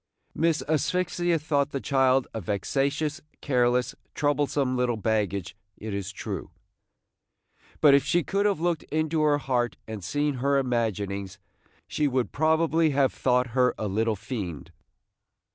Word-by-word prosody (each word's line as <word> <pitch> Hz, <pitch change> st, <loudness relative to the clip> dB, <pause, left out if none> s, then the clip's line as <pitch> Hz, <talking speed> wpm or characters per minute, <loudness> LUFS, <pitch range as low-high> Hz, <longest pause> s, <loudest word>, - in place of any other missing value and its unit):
Miss 160 Hz, 0 st, +1 dB
Asphyxia 175 Hz, +3 st, +1 dB
thought 145 Hz, -2 st, 0 dB
the 140 Hz, -, -3 dB
child 135 Hz, -1 st, +2 dB
a 110 Hz, -, -4 dB
vexatious, 140 Hz, -, -1 dB, 0.2 s
careless, 125 Hz, -2 st, +1 dB, 0.2 s
troublesome 145 Hz, -2 st, +1 dB
little 125 Hz, -2 st, 0 dB
baggage, 100 Hz, -4 st, -1 dB, 0.2 s
it 110 Hz, -1 st, -6 dB
is 100 Hz, -1 st, -4 dB
true; -, -, -6 dB, 1.3 s
but 145 Hz, -3 st, +7 dB
if 140 Hz, -1 st, +5 dB
she 165 Hz, +4 st, +1 dB
could 200 Hz, +6 st, +1 dB
have 200 Hz, -5 st, 0 dB
looked 170 Hz, -2 st, 0 dB
into 155 Hz, +1 st, 0 dB
her 150 Hz, -1 st, +3 dB
heart 125 Hz, -4 st, -1 dB
and 110 Hz, -3 st, -6 dB
seen 145 Hz, +6 st, -1 dB
her 140 Hz, +1 st, +2 dB
imaginings, 105 Hz, -7 st, -2 dB, 0.5 s
she 150 Hz, -, 0 dB
would 130 Hz, -2 st, -1 dB
probably 160 Hz, +2 st, +2 dB
have 140 Hz, -2 st, +2 dB
thought 125 Hz, -1 st, +1 dB
her 125 Hz, -1 st, +3 dB
a 110 Hz, -, -2 dB
little 110 Hz, +3 st, 0 dB
fiend. 95 Hz, -, -6 dB
135 Hz, 140 wpm, -26 LUFS, 115-155 Hz, 1.3 s, but